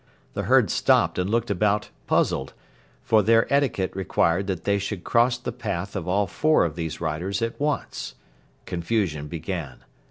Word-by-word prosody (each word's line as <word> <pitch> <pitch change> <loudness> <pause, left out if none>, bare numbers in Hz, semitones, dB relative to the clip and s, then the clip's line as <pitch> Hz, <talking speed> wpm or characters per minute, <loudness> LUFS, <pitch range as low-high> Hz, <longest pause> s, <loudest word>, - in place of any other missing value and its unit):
The - - -2
herd - - +5
stopped - - +3
and 90 +1 0
looked 115 0 0
about 105 +2 +1 0.2
puzzled, 65 - +1 0.5
for 110 -1 +4
their 115 +2 +4
etiquette 135 -11 +1
required 95 0 +1
that 95 -4 -3
they 100 0 +1
should 100 -2 -4
cross 120 +1 +3
the 120 - -5
path 100 -5 -4
of 95 -3 -4
all 100 +3 +2
four 155 - +2
of 80 -3 -3
these 80 -2 -4
riders 85 +6 -2
at 115 - -3
once. 145 0 -2 0.5
Confusion 85 -4 -1
began. 80 -4 -5
100 Hz, 160 wpm, -24 LUFS, 85-115 Hz, 0.5 s, herd